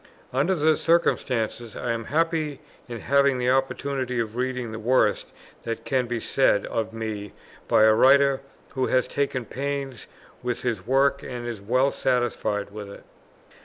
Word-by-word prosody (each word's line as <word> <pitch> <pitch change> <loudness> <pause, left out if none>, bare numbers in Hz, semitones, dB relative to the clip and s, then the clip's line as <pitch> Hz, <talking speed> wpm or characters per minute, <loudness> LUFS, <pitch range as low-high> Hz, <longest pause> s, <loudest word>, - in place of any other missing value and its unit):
Under 145 +9 +2
the 155 -1 +3
circumstances 120 -9 0
I 125 - -2
am 115 -1 -3
happy 155 +1 0 0.3
in 120 -2 -7
having 140 -1 +3
the 125 0 +1
opportunity 135 -1 -1
of 110 -1 -3
reading 125 -2 -2
the 110 - -6
worst 125 +4 +2 0.3
that 115 -1 -5
can 130 -3 0
be 120 0 -2
said 110 -5 +2
of 110 -1 -2
me 110 -3 -5 0.3
by - - +4
a 110 0 +7
writer 135 +3 +5 0.3
who 130 -1 -1
has 130 -1 +2
taken 135 -3 -2
pains 135 -1 -4 0.3
with 125 -1 -3
his 110 -5 -2
work 140 +2 +3
and 125 -2 -6
is 115 -4 -5
well 130 +6 +2
satisfied 120 -5 -1
with 105 -1 -8
it. 100 - -11
125 Hz, 160 wpm, -25 LUFS, 115-140 Hz, 0.3 s, a